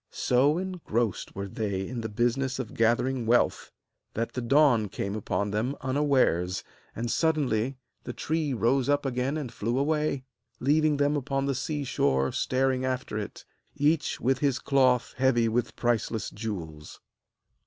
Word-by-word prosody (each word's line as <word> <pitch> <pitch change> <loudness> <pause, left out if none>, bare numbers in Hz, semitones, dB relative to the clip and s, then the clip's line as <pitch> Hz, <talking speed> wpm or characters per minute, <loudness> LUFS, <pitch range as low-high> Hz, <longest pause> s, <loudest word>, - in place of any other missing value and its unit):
So 135 +5 +2
engrossed 165 - -2
were 100 +1 -4
they 100 -4 -3
in 120 -2 -4
the 110 - -4
business 120 +4 0
of 130 -4 -5
gathering 120 +2 +1
wealth 120 +1 +2 0.4
that 115 +1 -2
the 125 - -3
dawn 120 -4 +4
came 100 +2 -3
upon 100 -1 -2
them 115 +7 -1
unawares; 130 - +1 0.3
and 115 +1 -2
suddenly 135 -6 +1 0.3
the - - -5
tree 155 -2 -1
rose 125 +3 +1
up 145 0 +2
again 130 +3 -1
and 130 -6 -5
flew 115 +4 -1
away, 150 -1 0 0.4
leaving 150 +2 +3
them 145 +1 +2
upon 135 -1 -1
the 140 - 0
sea 145 +3 -2
shore 70 - +1
staring 130 0 0
after 130 -3 -2
it, 105 - -7 0.3
each 150 +2 +1
with 130 +1 +1
his 140 -2 +1
cloth 130 -3 +2
heavy 130 -3 +3
with 120 +1 -1
priceless 115 -3 -1
jewels. 85 -9 -6
125 Hz, 150 wpm, -27 LUFS, 110-140 Hz, 0.4 s, dawn